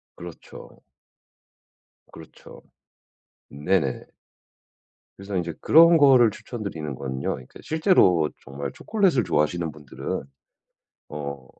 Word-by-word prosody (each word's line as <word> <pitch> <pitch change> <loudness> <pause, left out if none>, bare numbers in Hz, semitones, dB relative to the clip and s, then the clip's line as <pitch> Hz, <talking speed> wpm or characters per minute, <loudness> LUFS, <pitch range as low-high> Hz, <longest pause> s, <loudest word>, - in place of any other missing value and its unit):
그렇죠. 85 -1 -12 1.3
그렇죠. 80 -1 -14 0.9
네네. 75 -1 -1 1.1
그래서 100 0 -7
인제 85 -2 -3
그런 165 +2 +6
거를 130 -6 +6
추천 120 +2 -9
드리는 75 -7 -5
건요 65 0 -6
그러니까 65 - -14
실제로 155 - +3
정말 70 +1 -6
초콜릿을 190 - +1
좋아하시는 80 +2 -1
분들은 75 -2 -6 0.9
어 70 -3 -7
85 Hz, 240 characters per minute, -24 LUFS, -, 1.3 s, 그런